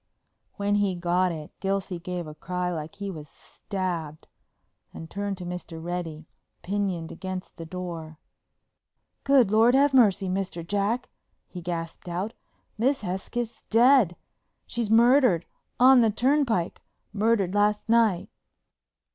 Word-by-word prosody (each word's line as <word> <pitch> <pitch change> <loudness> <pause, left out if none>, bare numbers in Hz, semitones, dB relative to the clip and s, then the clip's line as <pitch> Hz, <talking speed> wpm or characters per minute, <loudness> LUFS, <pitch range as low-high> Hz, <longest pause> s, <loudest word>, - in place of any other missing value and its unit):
When 205 0 0
he 200 -2 +2
got 175 +1 +1
it 155 -2 -7
Gilsey 195 -2 -2
gave 175 0 -5
a 155 - -8
cry 180 +3 -3
like 155 -1 -6
he 200 -1 -5
was 155 -4 -9
stabbed, 170 -4 -5 0.6
and 160 - -9
turned 200 -1 -3
to 180 - -7
Mr. 175 -2 -6
Reddy, 165 -2 -5 0.4
pinioned 190 -4 -2
against 185 +1 -6
the 165 - -8
door. 165 -3 -6 1.1
"Good 265 -7 +4
Lord, 225 +4 +5
have 280 +1 +4
mercy, 205 -6 +4
Mr. 185 -3 -3
Jack," 205 +6 -1 0.3
he 180 - -9
gasped 170 0 -5
out. 185 +6 -3 0.5
"Miss 265 +4 +2
Hesketh's 215 +5 -4
dead. 235 -5 +5 0.5
She's 235 -3 -3
murdered—on 245 - +4
the 225 - +4
turnpike—murdered 220 - 0
last 210 +1 +1
night!" 225 -5 +2
190 Hz, 120 wpm, -26 LUFS, 175-225 Hz, 1.1 s, Lord